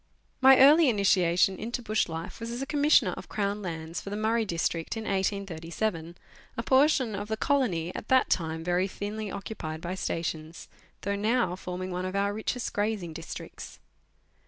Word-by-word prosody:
2 260 Hz, -, +5 dB
39 265 Hz, -1 st, +9 dB
My 265 Hz, -, +10 dB
early 300 Hz, +1 st, +7 dB
initiation 190 Hz, -3 st, +3 dB
into 235 Hz, +3 st, -3 dB
bush 215 Hz, -4 st, 0 dB
life 165 Hz, +2 st, -6 dB
was 230 Hz, 0 st, -5 dB
as 240 Hz, +1 st, -4 dB
a 270 Hz, -, -2 dB
Commissioner 295 Hz, +1 st, +4 dB
of -, -, -9 dB
Crown 205 Hz, 0 st, -1 dB
Lands 165 Hz, -2 st, -5 dB
for -, -, -7 dB
the 205 Hz, -, -3 dB
Murray 220 Hz, +1 st, +1 dB
District 165 Hz, +1 st, -2 dB
in 220 Hz, -, -4 dB
1837, 185 Hz, -3 st, -2 dB, 0.4 s
a 230 Hz, -, -2 dB
portion 260 Hz, -3 st, +3 dB
of 205 Hz, +1 st, -4 dB
the 220 Hz, 0 st, -2 dB
colony 215 Hz, -, 0 dB
at -, -, -7 dB
that 260 Hz, 0 st, +4 dB
time 160 Hz, -1 st, -1 dB
very 180 Hz, +2 st, +1 dB
thinly 205 Hz, +2 st, -5 dB
occupied 190 Hz, -6 st, -6 dB
by 175 Hz, +2 st, -4 dB
stations, 165 Hz, -3 st, -4 dB, 0.3 s
though 200 Hz, 0 st, -1 dB
now 215 Hz, -2 st, +1 dB
forming 185 Hz, 0 st, -5 dB
one 180 Hz, +1 st, -3 dB
of 185 Hz, +1 st, -4 dB
our 200 Hz, +1 st, +1 dB
richest 220 Hz, +3 st, -3 dB
grazing 205 Hz, -5 st, -1 dB
districts. 165 Hz, +1 st, -8 dB
200 Hz, 180 wpm, -28 LUFS, 175-225 Hz, 0.4 s, My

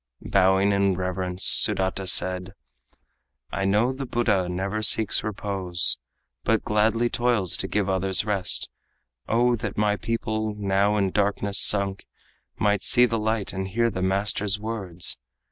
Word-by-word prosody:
Bowing 95 Hz, +1 st, +2 dB
in 100 Hz, -1 st, +1 dB
reverence, 90 Hz, 0 st, -4 dB
Sudata 95 Hz, 0 st, +6 dB
said: 90 Hz, 0 st, +1 dB, 1.0 s
"I 95 Hz, -, -3 dB
know 105 Hz, +6 st, +1 dB
the 135 Hz, 0 st, -7 dB
Buddha 105 Hz, -7 st, -1 dB
never 95 Hz, +4 st, -4 dB
seeks 110 Hz, 0 st, +2 dB
repose, 95 Hz, -4 st, 0 dB, 0.4 s
But -, -, 0 dB
gladly 110 Hz, +3 st, 0 dB
toils 120 Hz, -7 st, -1 dB
to -, -, -3 dB
give 105 Hz, -2 st, -1 dB
to 95 Hz, -, -2 dB
others 95 Hz, +1 st, +1 dB
rest. 100 Hz, -4 st, -1 dB, 0.6 s
O 120 Hz, +2 st, +2 dB
that 105 Hz, -2 st, -6 dB
my 105 Hz, 0 st, 0 dB
people, 110 Hz, -1 st, -4 dB
now 100 Hz, +1 st, 0 dB
in 100 Hz, -2 st, -1 dB
darkness 100 Hz, 0 st, 0 dB
sunk, 100 Hz, -1 st, 0 dB, 0.5 s
Might 105 Hz, -2 st, 0 dB
see 125 Hz, +2 st, +4 dB
the 115 Hz, -2 st, -2 dB
light 110 Hz, -1 st, -3 dB
and 95 Hz, 0 st, -4 dB
hear 115 Hz, +4 st, -1 dB
the 95 Hz, -, -5 dB
master's 100 Hz, +2 st, -1 dB
words! 100 Hz, -6 st, -3 dB
100 Hz, 145 wpm, -23 LUFS, 95-110 Hz, 1.0 s, Sudata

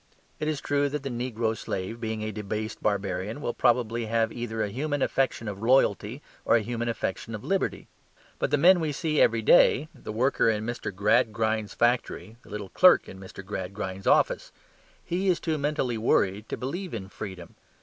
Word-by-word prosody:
It 150 Hz, -, -2 dB
is 155 Hz, -3 st, -1 dB
true 145 Hz, 0 st, +1 dB
that 145 Hz, 0 st, -4 dB
the 140 Hz, -, -3 dB
negro 120 Hz, -2 st, -2 dB
slave, 110 Hz, +3 st, -5 dB
being 110 Hz, -1 st, -3 dB
a 110 Hz, -, -3 dB
debased 105 Hz, +1 st, -5 dB
barbarian, 100 Hz, +2 st, -1 dB
will 120 Hz, -5 st, -3 dB
probably 120 Hz, -2 st, +1 dB
have 115 Hz, 0 st, +1 dB
either 110 Hz, -2 st, -3 dB
a 105 Hz, -, -3 dB
human 145 Hz, +4 st, -1 dB
affection 130 Hz, -4 st, 0 dB
of 100 Hz, -1 st, -5 dB
loyalty, 120 Hz, 0 st, +2 dB, 0.2 s
or -, -, +4 dB
a 115 Hz, -, +3 dB
human 120 Hz, +1 st, -3 dB
affection 110 Hz, 0 st, -3 dB
for -, -, -13 dB
liberty. 195 Hz, 0 st, -1 dB, 0.5 s
But -, -, 0 dB
the 145 Hz, -, +2 dB
man 180 Hz, +5 st, +6 dB
we 155 Hz, -3 st, -1 dB
see 155 Hz, 0 st, 0 dB
every 115 Hz, -1 st, +3 dB
day 150 Hz, +7 st, +5 dB
the 125 Hz, -6 st, -8 dB
worker 120 Hz, +2 st, +2 dB
in 110 Hz, -1 st, -1 dB
Mr. 120 Hz, -2 st, -4 dB
Gradgrind's 105 Hz, +2 st, +1 dB
factory, 120 Hz, -4 st, 0 dB
the -, -, -18 dB
little 105 Hz, -2 st, -6 dB
clerk 180 Hz, -, +5 dB
in 95 Hz, -, -10 dB
Mr. 95 Hz, 0 st, -10 dB
Gradgrind's 95 Hz, 0 st, -5 dB
office -, -, +2 dB, 0.5 s
he 185 Hz, +3 st, -1 dB
is 180 Hz, -3 st, +3 dB
too 160 Hz, -2 st, -2 dB
mentally 135 Hz, -5 st, -1 dB
worried 105 Hz, -1 st, +1 dB
to -, -, -3 dB
believe 170 Hz, +5 st, -4 dB
in 95 Hz, -4 st, -6 dB
freedom. 95 Hz, -4 st, -8 dB
115 Hz, 185 wpm, -27 LUFS, 105-135 Hz, 0.5 s, man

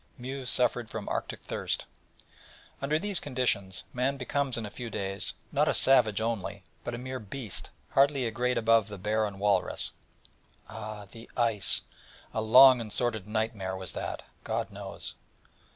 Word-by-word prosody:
Mew 130 Hz, +2 st, -5 dB
suffered 120 Hz, -2 st, +1 dB
from 110 Hz, -2 st, -5 dB
'Arctic -, -, -3 dB
thirst. -, -, -1 dB, 1.0 s
Under 145 Hz, +3 st, +2 dB
these 200 Hz, +1 st, +1 dB
conditions, 120 Hz, -9 st, -1 dB
man 130 Hz, +3 st, 0 dB
becomes 135 Hz, -1 st, -1 dB
in 115 Hz, -, -3 dB
a 105 Hz, -, -7 dB
few 120 Hz, +1 st, -6 dB
days, 95 Hz, -2 st, -2 dB, 0.2 s
not -, -, +3 dB
a -, -, +3 dB
savage 120 Hz, -6 st, +6 dB
only, 110 Hz, -4 st, -2 dB, 0.2 s
but 120 Hz, -, -3 dB
a -, -, -5 dB
mere 130 Hz, +1 st, -5 dB
beast, 110 Hz, -2 st, -5 dB, 0.2 s
hardly 140 Hz, -1 st, +4 dB
a 115 Hz, -, -1 dB
grade 125 Hz, +2 st, 0 dB
above 115 Hz, -2 st, +4 dB
the 105 Hz, -1 st, -7 dB
bear 105 Hz, +3 st, +1 dB
and 100 Hz, -1 st, -8 dB
walrus. 100 Hz, -2 st, +1 dB, 0.8 s
Ah, 110 Hz, -1 st, -7 dB
the 115 Hz, 0 st, -12 dB
ice! 115 Hz, -4 st, +2 dB, 0.5 s
A 110 Hz, -, 0 dB
long 125 Hz, +3 st, +8 dB
and 110 Hz, -2 st, -6 dB
sordid 110 Hz, -3 st, 0 dB
nightmare 105 Hz, -3 st, -1 dB
was 95 Hz, -1 st, -5 dB
that, -, -, -4 dB, 0.2 s
God -, -, -2 dB
knows. -, -, -6 dB
115 Hz, 160 wpm, -29 LUFS, 105-125 Hz, 1.0 s, long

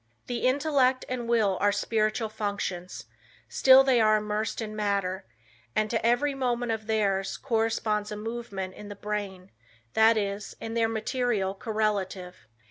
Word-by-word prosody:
"The 245 Hz, 0 st, -1 dB
intellect 265 Hz, -2 st, +2 dB
and 245 Hz, -2 st, -4 dB
will 215 Hz, -5 st, +2 dB
are 205 Hz, 0 st, +4 dB
spiritual 215 Hz, +1 st, 0 dB
functions; 185 Hz, -, -4 dB, 0.4 s
still 265 Hz, -, +6 dB
they 260 Hz, -3 st, +3 dB
are 215 Hz, 0 st, +5 dB
immersed 210 Hz, +1 st, -2 dB
in 215 Hz, -2 st, -5 dB
matter, 200 Hz, -, -1 dB, 0.5 s
and 215 Hz, 0 st, +1 dB
to 225 Hz, -, -1 dB
every 245 Hz, +5 st, +2 dB
movement 245 Hz, -3 st, -1 dB
of 220 Hz, -1 st, -4 dB
theirs, 195 Hz, -3 st, 0 dB
corresponds 225 Hz, -4 st, -1 dB
a 210 Hz, -, -4 dB
movement 210 Hz, -4 st, -5 dB
in 210 Hz, +1 st, -10 dB
the 205 Hz, -, -7 dB
brain, 200 Hz, -3 st, -5 dB, 0.4 s
that 220 Hz, +1 st, +5 dB
is, 200 Hz, -1 st, -3 dB
in 225 Hz, -, -5 dB
their 230 Hz, -1 st, +2 dB
material 220 Hz, -3 st, -1 dB
correlative." 200 Hz, -, -3 dB
215 Hz, 145 wpm, -27 LUFS, 200-235 Hz, 0.5 s, still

